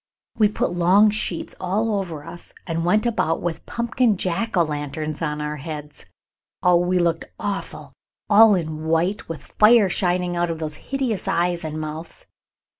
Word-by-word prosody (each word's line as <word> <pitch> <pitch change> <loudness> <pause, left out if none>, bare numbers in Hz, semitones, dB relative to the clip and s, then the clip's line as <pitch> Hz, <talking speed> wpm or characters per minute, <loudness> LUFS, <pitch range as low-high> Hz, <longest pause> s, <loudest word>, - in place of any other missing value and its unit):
We 215 - +6
put 205 - -1
long 185 +5 +5
sheets 200 -5 -3
all 210 +5 0
over 165 -6 -6
us 170 +1 -11
and 165 -1 -2
went 210 +6 +2
about 215 -8 0
with 170 -2 -4
pumpkin 235 -2 +1
jack 185 +5 -2
o' 170 - +5
lanterns 150 0 -4
on 150 -2 -2
our 150 0 -3
heads. 150 0 -8 0.6
Oh, 180 -1 +5
we 175 +1 +1
looked 170 -2 +1
awful, 200 -1 -5 0.3
all 215 0 +7
in 155 -3 -4
white, 165 +5 0
with 165 - -6
fire 215 -2 +6
shining 180 -1 0
out 175 0 0
of 165 - -3
those 155 -1 -4
hideous 265 -7 -2
eyes 175 0 0
and 155 0 -4
mouths. 155 +2 -7
175 Hz, 165 wpm, -22 LUFS, 160-205 Hz, 0.6 s, all